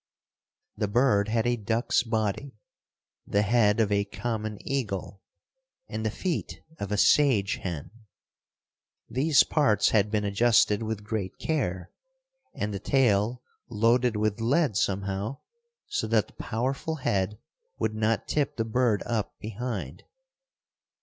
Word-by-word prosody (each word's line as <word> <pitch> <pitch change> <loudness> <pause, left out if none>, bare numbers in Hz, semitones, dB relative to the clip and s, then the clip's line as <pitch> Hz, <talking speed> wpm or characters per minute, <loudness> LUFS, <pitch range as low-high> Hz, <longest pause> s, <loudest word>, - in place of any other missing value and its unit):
The 105 - 0
bird 105 -2 +3
had 110 +1 0
a 120 0 +2
duck's 115 +3 +1
body, 110 +3 -2 0.7
the 100 +1 +2
head 105 -1 +3
of 105 -2 +2
a 100 0 +2
common 110 +1 -4
eagle 100 -7 -3 0.7
and 110 - -4
the 110 - +1
feet 175 - -3 0.2
of 100 0 -4
a 105 - +1
sage 110 -5 +4
hen. 85 -3 -5 1.2
These 140 +4 +4
parts 110 -10 +2
had 105 -1 +2
been 105 -1 0
adjusted 105 0 +3
with 110 -2 -3
great 105 -3 -4
care 95 - -2 0.6
and 105 0 -3
the 100 - -3
tail 120 0 +2 0.3
loaded 115 +2 +2
with 105 +1 0
lead 140 - +2
somehow, 100 +6 -1 0.4
so 415 - -2
that 110 -2 +2
the - - -22
powerful 135 +7 -2
head 105 -7 -1 0.4
would 110 - -1
not 110 0 0
tip 145 -2 -1
the 115 - 0
bird 115 -2 +1
up 110 -4 -2
behind. 105 - -5
110 Hz, 130 wpm, -27 LUFS, 100-120 Hz, 1.2 s, sage